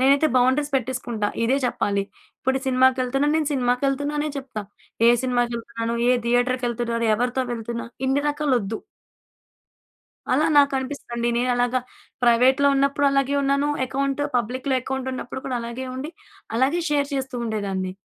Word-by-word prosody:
నేనైతే 275 +4 +4
బౌండరీస్ 260 +4 +2
పెట్టేసుకుంటా. 245 -4 -2 0.2
ఇదే 255 +4 +2
చెప్పాలి. 200 -4 0 0.4
ఇప్పుడు 265 +1 +1
సినిమాకెళ్తున్నాను. 260 +2 +2
నేను 310 -2 0
సినిమాకెళ్తున్నా 275 +3 0
అనే 305 - -1
చెప్తా. 260 -6 -6 0.5
ఏ - - +8
సినిమాకెళ్తున్నాను? 235 -2 -1
ఏ - - +6 0.2
థియేటర్‌కెళ్తున్నాను? 240 -1 0
ఎవరితో 245 +3 0
వెళ్తున్నా 235 0 -4 0.2
ఇన్ని 270 +2 +2
రకాలొద్దు. 255 -8 -1 1.5
అలా 300 +5 +3
నాకు 280 0 +5
అనిపిస్తదండి. 240 -3 -3
నేనలాగా 245 0 +1 0.4
ప్రైవేట్‌లో 250 +4 +5
ఉన్నప్పుడు 280 +1 +2
అలాగే 275 0 +1
ఉన్నాను 280 +1 +1 0.2
అకౌంట్. 275 +2 -1
పబ్లిక్‌లో 255 +3 -1
అకౌంట్ 265 0 -3
ఉన్నప్పుడు 255 +1 -6
కూడా 255 -2 -1
అలాగే 235 +3 -5
ఉండి 290 +5 -5 0.4
అలాగే 270 +8 +2
షేర్ 285 -1 +1
చేస్తూ 265 -1 -4
ఉండేదాన్ని. 195 -4 -2
255 Hz, 125 wpm, -23 LUFS, 240-275 Hz, 1.5 s, ఏ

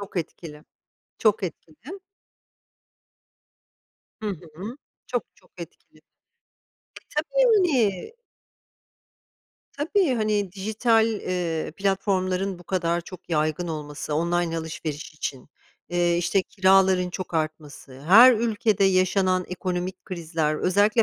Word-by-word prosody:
çok 200 -1 -9
etkili. 155 -2 -6 0.5
Çok 215 -1 +2
etkili. 185 - -8 2.2
Hı 215 - -3
hı, 180 - -7 0.3
çok, - - -1
çok - - -26
etkili. - - -12
E, - - -23 1.2
tabii. 345 - +2 1.6
Tabii, 325 0 +1
hani, 210 -4 0
dijital, 220 +3 +2
eee, 180 -8 -2
platformların 195 -1 0
bu 175 - -15
kadar 170 -1 0
çok 185 +1 -12
yaygın 155 +2 0
olması, 150 -1 -5
online 170 +1 0
alışveriş 160 -2 -6
için, 140 -3 -5 0.4
eee, 175 -1 +1
işte, 185 +2 +1
kiraların 190 -1 +3
çok 180 -2 -6
artması, 150 -4 -4
her 225 +10 +8
ülkede 215 -3 +1
yaşanan 185 -1 +2
ekonomik 180 0 -4
krizler, 160 -3 -2
özellikle 205 +7 +3
185 Hz, 100 wpm, -24 LUFS, 165-210 Hz, 2.2 s, her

